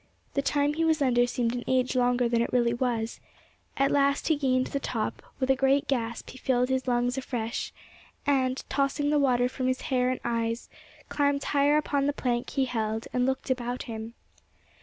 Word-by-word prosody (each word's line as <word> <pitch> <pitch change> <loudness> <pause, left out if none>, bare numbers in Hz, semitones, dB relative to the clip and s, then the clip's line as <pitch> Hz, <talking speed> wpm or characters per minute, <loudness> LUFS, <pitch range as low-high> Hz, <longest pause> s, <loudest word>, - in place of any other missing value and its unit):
The 280 - +1
time 290 +1 +1
he 325 +2 0
was 320 -1 +3
under 245 -3 +3
seemed 240 -1 -1
an 245 -1 -3
age 255 0 +1
longer 245 -1 +2
than 235 0 +1
it 235 - -1
really 235 -1 +2
was; 235 -2 -2 0.6
at 275 0 +2
last 280 +1 +2
he 315 - +4
gained 260 -3 +1
the 280 - -3
top; 225 -5 -3 0.2
with 260 0 +2
a - - +4
great 270 +2 +2
gasp 235 -4 -2
he 260 - -12
filled 250 -1 +1
his 260 0 -1
lungs 245 +1 +1
afresh, 235 -3 -3 0.5
and, 260 -2 +1
tossing 280 +2 0
the 300 - +3
water 250 -3 +3
from 255 0 -3
his 255 0 0
hair 250 0 +3
and 255 - -1
eyes, 230 0 -1 0.4
climbed 285 -1 +1
higher 290 +1 +3
upon 285 -2 0
the 290 - +1
plank 240 -3 -1
he 270 -1 0
held, 220 -2 -2
and 250 0 +2
looked 265 0 -1
about 245 -1 -2
him. 225 0 -7
255 Hz, 195 wpm, -27 LUFS, 240-275 Hz, 0.6 s, he